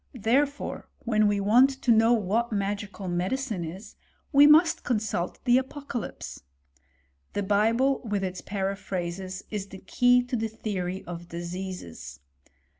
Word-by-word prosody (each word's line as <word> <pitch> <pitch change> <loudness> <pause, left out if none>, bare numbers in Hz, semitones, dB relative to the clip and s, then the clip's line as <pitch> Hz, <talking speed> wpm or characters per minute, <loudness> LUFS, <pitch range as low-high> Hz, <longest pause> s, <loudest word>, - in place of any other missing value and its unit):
Therefore, 275 +6 0 0.2
when 215 -2 +3
we 205 -1 +1
want 230 +7 +5
to 245 - +2
know 225 +1 +5
what 230 +1 +1
magical 200 -1 -3
medicine 190 +4 -2
is, 190 +6 -9 0.3
we 285 0 +8
must 315 +3 +5
con 240 -4 +1
salt 200 -5 -3
the 245 0 +5
Apocalypse. 265 -2 -6 0.9
The 205 - -1
Bible, 225 +7 +2
with 205 -4 -2
its 185 -1 -4
paraphrases, 190 -2 -4
is 205 -2 -3
the 195 - -10
key 245 +5 +3
to 245 +1 -3
the 225 -1 -1
theory 190 -4 -4
of 175 0 -8
diseases. 175 - -7
205 Hz, 135 wpm, -27 LUFS, 190-240 Hz, 0.9 s, we